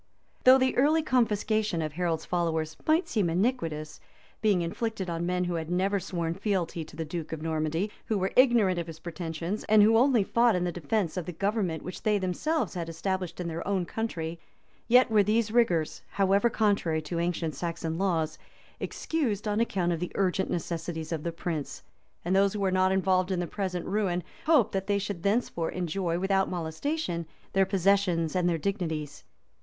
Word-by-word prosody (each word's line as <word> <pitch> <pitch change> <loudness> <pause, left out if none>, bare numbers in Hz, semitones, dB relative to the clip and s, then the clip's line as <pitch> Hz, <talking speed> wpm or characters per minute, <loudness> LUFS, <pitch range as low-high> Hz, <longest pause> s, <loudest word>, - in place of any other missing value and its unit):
Though 260 +1 +9
the 260 0 +1
early 305 +5 +4
confiscation 215 - +1
of 155 -1 -4
Harold's 165 -1 -1
followers 160 -2 -1
might 320 +4 +3
seem 205 -7 +1
iniquitous, 165 -6 -1 0.4
being 205 -5 +3
inflicted 190 +1 -3
on 170 +1 -2
men 180 0 0
who 175 -1 -2
had 165 -1 -3
never 190 +3 +1
sworn 170 -3 -3
fealty 185 -4 -1
to 155 - -14
the 160 0 -3
duke 160 0 -5
of 160 -1 -5
Normandy, 160 +5 -1 0.2
who 220 - +1
were 190 0 -1
ignorant 235 -8 +5
of 170 - -4
his 165 -1 -8
pretensions, 170 +3 -4
and 215 -1 +6
who 220 +2 +5
only 250 -4 +4
fought 235 +2 +3
in 180 - 0
defence 175 +1 -1
of 180 - -3
the - - -3
government 195 -2 -1
which 180 - -7
they 210 -1 +2
themselves 205 - -1
had 170 -3 -4
established 185 +2 -3
in 175 - -3
their 165 +1 -4
own 195 -3 0
country, 170 -6 -4 0.5
yet 250 0 +5
were 215 -1 +6
these 215 +2 +1
rigors, 180 -10 +2
however 200 +3 +2
contrary 200 -8 +1
to 170 +3 -4
the - - +1
ancient 170 -2 -1
Saxon 165 +2 -3
laws, 165 -5 0 0.4
excused 235 -10 -2
on 210 +1 0
account 190 -6 +1
of 170 - -1
the 180 - -4
urgent 190 0 +1
necessities 165 -1 -3
of 160 -2 -2
the 170 - -3
prince; 165 -3 -4 0.4
and 180 +2 +1
those 195 0 +4
who 210 - -3
were 195 -1 +1
not 185 0 +3
involved 185 -1 +2
in 185 -2 0
the 175 - -1
present 180 -2 -3
ruin, 185 -3 0 0.2
hoped 300 -10 +4
that 195 0 -2
they 205 -1 +2
should 200 -3 -4
thenceforth 200 -4 0
enjoy, 175 -1 -1
without 195 +1 +1
molestation, 175 - -3 0.3
their 195 -1 +3
possessions 190 -4 +2
and 180 -1 +2
their 170 - +1
dignities. 160 -4 -3
185 Hz, 185 wpm, -28 LUFS, 165-205 Hz, 0.5 s, Though